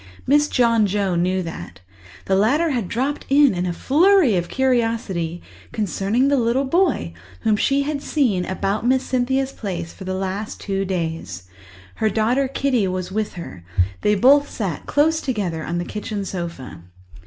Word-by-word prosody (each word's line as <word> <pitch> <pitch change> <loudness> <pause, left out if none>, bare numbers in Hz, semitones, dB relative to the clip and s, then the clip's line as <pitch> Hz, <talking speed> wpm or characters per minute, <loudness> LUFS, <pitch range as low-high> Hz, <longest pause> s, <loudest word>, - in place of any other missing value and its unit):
Mrs. 295 +2 +4
John 230 -4 +3
Joe 200 -1 0
knew 180 +2 0
that; 95 - -8 0.5
the 190 - +1
latter 285 +12 +2
had 235 -8 -1
dropped 265 +8 -2
in 280 -2 +5
in 180 0 -2
a - - -1
flurry 310 - +4
of 175 -1 -1
curiosity 225 -10 -1 0.3
concerning 210 +4 0
the 285 0 +3
little 240 +4 +1
boy 285 - +1 0.3
whom 215 - +2
she 275 +6 +1
had 290 0 -3
seen 240 -14 +1
about 195 +2 -2
Miss 260 +2 +2
Cynthia's 265 +1 0
place 175 -8 -5
for - - -10
the 185 0 -2
last 195 +3 -4
two 195 -1 -2
days. 165 - -4 0.5
Her 220 - +1
daughter 240 +6 +1
Kitty 255 -5 0
was 185 0 -3
with 215 +1 -2
her; 95 - -9 0.4
they 210 - +3
both 280 +7 +5
sat 190 -9 -4
close 315 +2 +2
together 195 - -2
on 170 - -3
the 175 - -2
kitchen 210 -1 -4
sofa. 170 - -6
215 Hz, 165 wpm, -21 LUFS, 185-265 Hz, 0.5 s, in